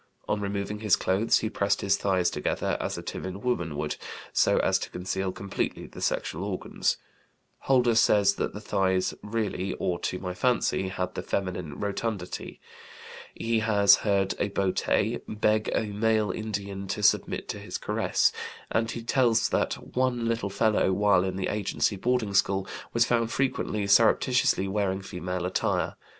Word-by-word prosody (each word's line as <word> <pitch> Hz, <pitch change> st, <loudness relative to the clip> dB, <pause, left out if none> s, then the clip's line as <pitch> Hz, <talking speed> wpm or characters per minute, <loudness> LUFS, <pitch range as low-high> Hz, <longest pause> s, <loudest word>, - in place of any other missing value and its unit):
On 105 Hz, -, 0 dB
removing 100 Hz, +1 st, -3 dB
his 105 Hz, -3 st, +4 dB
clothes 95 Hz, +5 st, +2 dB
he 110 Hz, -, -1 dB
pressed 100 Hz, 0 st, 0 dB
his 100 Hz, 0 st, +3 dB
thighs 95 Hz, -3 st, +1 dB
together, -, -, -1 dB
as -, -, -3 dB
a -, -, -6 dB
timid 95 Hz, +3 st, -6 dB
woman 85 Hz, -12 st, -1 dB
would, 75 Hz, 0 st, -2 dB, 0.4 s
so -, -, +3 dB
as -, -, +2 dB
to -, -, -5 dB
conceal 95 Hz, +1 st, -3 dB
completely 100 Hz, +1 st, -3 dB
the -, -, -11 dB
sexual 85 Hz, +5 st, -1 dB
organs; 100 Hz, -2 st, -1 dB, 0.6 s
Holder 125 Hz, -3 st, +3 dB
says 105 Hz, -3 st, +4 dB
that -, -, -2 dB
the 105 Hz, -, -7 dB
thighs 95 Hz, -3 st, +1 dB
"really, 105 Hz, -3 st, -2 dB
or 85 Hz, -1 st, -2 dB
to 90 Hz, -, -2 dB
my 90 Hz, -1 st, -4 dB
fancy," 120 Hz, -3 st, +1 dB
had 90 Hz, -1 st, -3 dB
the -, -, -4 dB
feminine 90 Hz, -6 st, -3 dB
rotundity. 100 Hz, -2 st, -4 dB, 0.8 s
He 115 Hz, 0 st, 0 dB
has 105 Hz, -2 st, +5 dB
heard 100 Hz, -2 st, +1 dB
a 100 Hz, -, 0 dB
boté 95 Hz, -2 st, 0 dB
"beg 110 Hz, 0 st, +1 dB
a -, -, 0 dB
male 110 Hz, +1 st, +1 dB
Indian 100 Hz, -2 st, -4 dB
to 95 Hz, +2 st, -3 dB
submit -, -, +2 dB
to -, -, -4 dB
his -, -, -5 dB
caress," -, -, +1 dB, 0.4 s
and 115 Hz, 0 st, +1 dB
he 115 Hz, 0 st, -5 dB
tells 120 Hz, -2 st, +2 dB
that -, -, 0 dB, 0.2 s
"one 125 Hz, -2 st, +1 dB
little 115 Hz, -3 st, -1 dB
fellow, 105 Hz, -1 st, +2 dB
while 100 Hz, -2 st, +3 dB
in 95 Hz, -1 st, -2 dB
the 95 Hz, -1 st, -2 dB
agency 105 Hz, 0 st, 0 dB
boarding 115 Hz, 0 st, 0 dB
school, 95 Hz, 0 st, +2 dB, 0.2 s
was 115 Hz, 0 st, +3 dB
found 115 Hz, -1 st, +1 dB
frequently 115 Hz, -6 st, -1 dB
surreptitiously 110 Hz, 0 st, +4 dB
wearing 95 Hz, -1 st, -1 dB
female 90 Hz, -1 st, -4 dB
attire. 90 Hz, -, 0 dB
100 Hz, 160 wpm, -27 LUFS, 95-110 Hz, 0.8 s, has